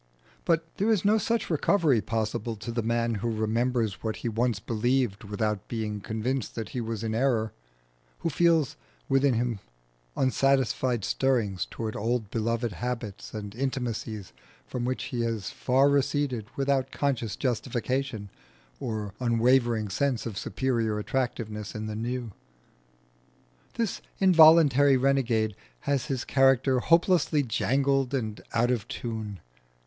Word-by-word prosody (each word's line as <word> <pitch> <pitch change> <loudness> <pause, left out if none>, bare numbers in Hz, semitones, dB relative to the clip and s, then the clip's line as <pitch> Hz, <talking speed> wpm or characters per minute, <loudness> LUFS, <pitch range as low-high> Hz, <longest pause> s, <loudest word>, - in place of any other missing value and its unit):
But 165 -1 +2
there 210 +2 +1
is 210 -4 +2
no 215 +2 +4
such 230 +1 0
recovery 155 - +3
possible 110 +1 -2
to 115 +3 -6
the 115 0 -1
man 115 +1 0
who 120 - 0
remembers 115 0 0
what 110 -1 -2
he - - +1
once 115 -1 0
believed 115 0 0
without 105 -1 -2
being 110 -3 -3
convinced 110 +5 -3
that 115 -2 -4
he 125 - -3
was 115 -1 -4
in 110 -1 -2
error, 115 -3 +1 0.7
who 165 - 0
feels 165 -2 +3 0.3
within 135 -1 +3
him 120 -2 -1 0.6
unsatisfied 130 -3 +2
stirrings 115 -9 0
towards 110 -1 -4
old 115 -1 -1
beloved 115 +1 -1
habits 115 -1 -5
and 105 -1 -6
intimacies 120 -5 -3 0.3
from 120 -1 -4
which 130 +1 -2
he 120 - 0
has 115 -4 -2
far 135 +2 +3
receded 140 -5 +1
without 135 -1 +1
conscious 130 -7 -1
justification 125 -3 -2 0.5
or 105 -4 -4
unwavering 120 -2 +2
sense 125 +4 -1
of 115 -4 -4
superior 115 -1 -1
attractiveness 110 -3 -3
in 110 0 -4
the 110 0 -4
new. 120 +1 -3 1.4
This 230 -4 -2 0.2
involuntary 155 -6 +6
renegade 125 -6 +1 0.3
has 140 -3 0
his 135 -4 -2
character 135 -1 +3
hopelessly 165 -1 +3
jangled 135 +2 +1
and 110 -5 -3
out 120 +2 +2
of 120 -3 -1
tune. 110 -6 -5
120 Hz, 135 wpm, -27 LUFS, 110-135 Hz, 1.4 s, involuntary